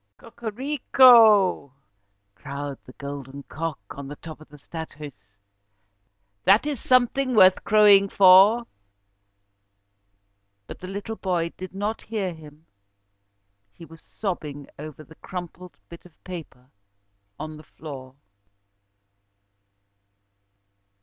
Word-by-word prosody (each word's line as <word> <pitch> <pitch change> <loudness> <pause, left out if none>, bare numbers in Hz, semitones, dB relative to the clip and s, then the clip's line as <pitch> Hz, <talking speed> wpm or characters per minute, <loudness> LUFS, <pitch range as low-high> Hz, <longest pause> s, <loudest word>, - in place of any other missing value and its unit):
"Cocorico!" 230 - +3 0.6
crowed 140 +1 -7
the 125 - -13
golden 140 0 -9
cock 160 +1 -5
on 140 -1 -9
the 145 - -8
top 155 0 -12
of 155 - -16
the 150 - -15
'Stadhuis'. 145 -10 -11 1.1
"That 200 - +4
is 295 -5 -3
something 255 +1 +1
worth 185 -3 +5
crowing 205 -2 +5
for." 195 +5 +6 2.0
But - - -11
the 185 - -9
little 205 +3 -6
boy 175 -3 -2
did 185 0 -10
not 210 +3 -3
hear 205 -5 -4
him, 155 -1 -16 1.1
he 165 - -13
was 165 -1 -16 0.2
sobbing 150 -8 -5
over 155 0 -10
the 160 - -17
crumpled 180 0 -9
bit 170 - -13
of 175 -3 -22
paper 155 -8 -11 0.7
on 155 0 -7
the 155 - -14
floor. 135 -5 -11
170 Hz, 105 wpm, -24 LUFS, 145-205 Hz, 2.0 s, for